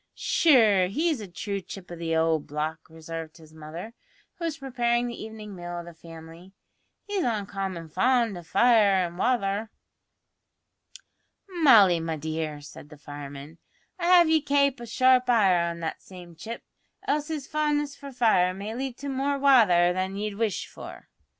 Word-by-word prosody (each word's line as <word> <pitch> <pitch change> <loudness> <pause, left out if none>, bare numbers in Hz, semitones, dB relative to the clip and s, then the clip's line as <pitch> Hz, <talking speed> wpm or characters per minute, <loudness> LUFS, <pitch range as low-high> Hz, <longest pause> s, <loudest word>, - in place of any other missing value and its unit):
"Sure, 245 - +4
he's 300 - -1
a 205 - -7
true 200 +3 -5
chip 185 0 -10
o' - - -5
the 165 -1 -2
owld 160 -1 +1
block," 155 +2 -4
observed 160 0 -8
his 160 -1 -17
mother, 160 +8 -9 0.5
who 335 - -3
was 320 -2 -3
preparing 240 -3 0
the 235 -2 -6
evening 215 -2 -9
meal 175 -1 -6
of 170 - -6
the 170 - -11
family; 165 +2 -13 0.5
"he's 405 -3 -2
uncommon 195 -6 -3
fond 230 +5 +1
o' 175 - -7
fire 215 +3 +4
an' 170 0 -8
wather." 210 -1 0 1.8
"Molly, 230 - +5
my 165 0 -3
dear," 155 -1 -4
said 145 0 -12
the 150 - -13
fireman, 145 +2 -10 0.4
"I'd 340 - -2
have 350 -1 +6
ye 320 -1 +4
kape 280 -2 +1
a 235 - -8
sharp 255 +2 +3
eye 185 -7 +3
on 170 0 -7
that 160 - -4
same 175 -2 -13
chip, 225 +8 -8 0.4
else 295 0 0
his 310 -4 -4
fondness 295 -2 -1
for 280 -1 -10
fire 205 -8 +2
may 205 +3 -6
lead 255 0 -5
to 285 - -7
more 275 +1 -1
wather 215 -11 +5
than 185 +1 -3
ye'd 210 +1 -3
wish 215 -1 -2
for." - - -12
200 Hz, 165 wpm, -26 LUFS, 170-255 Hz, 1.8 s, have